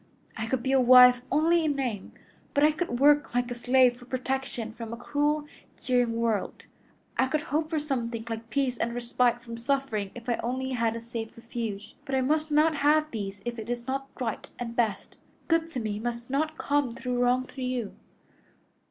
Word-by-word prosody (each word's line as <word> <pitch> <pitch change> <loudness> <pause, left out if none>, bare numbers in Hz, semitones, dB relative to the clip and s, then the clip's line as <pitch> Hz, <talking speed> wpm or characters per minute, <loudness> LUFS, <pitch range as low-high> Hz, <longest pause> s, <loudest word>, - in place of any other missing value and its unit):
I 220 -1 -3
could 240 0 -1
be 265 - 0
a 270 -1 +5
wife 250 0 +8
only 325 +3 +3
in 300 -2 +1
name, 245 -8 -3 0.4
but 285 - +4
I 305 - +6
could 305 -6 -3
work 290 -2 +4
like 245 0 0
a - - 0
slave 245 0 +3
for 245 - -14
protection 255 -3 -3
from 230 -1 -7
a 235 - -5
cruel, 295 +4 0 0.3
jeering 245 -2 +1
world; 230 -3 -1 0.5
I 260 - +4
could 300 +3 -1
hope 310 +1 +1
for 325 - -1
something 240 -6 -2
like 225 0 -5
peace 260 -2 0
and 235 +1 -1
respite 240 0 +1
from 230 -1 -7
suffering 235 -5 -1
if 240 0 -10
I 240 - +1
only 260 +2 -2
had 230 -3 0
a 230 - -6
safe 230 -1 -6
refuge. 230 -3 -5
But 275 -2 -2
I 260 - +2
must 305 +4 +1
not 305 +1 +3
have 305 +2 +3
these 200 -3 -5
if 240 -1 -4
it 220 +1 -7
is 240 -1 -3
not 270 +1 -3
right 235 -4 -3
and 235 -1 -5
best. 225 -4 -1 0.3
Good 330 -1 +2
to 265 - -4
me 215 -2 -3
must 235 +2 -4
not 310 +3 0
come 285 -4 0
through 250 0 -3
wrong 250 +1 +2
to 270 - -7
you." 250 -4 -2
250 Hz, 200 wpm, -28 LUFS, 230-280 Hz, 0.5 s, wife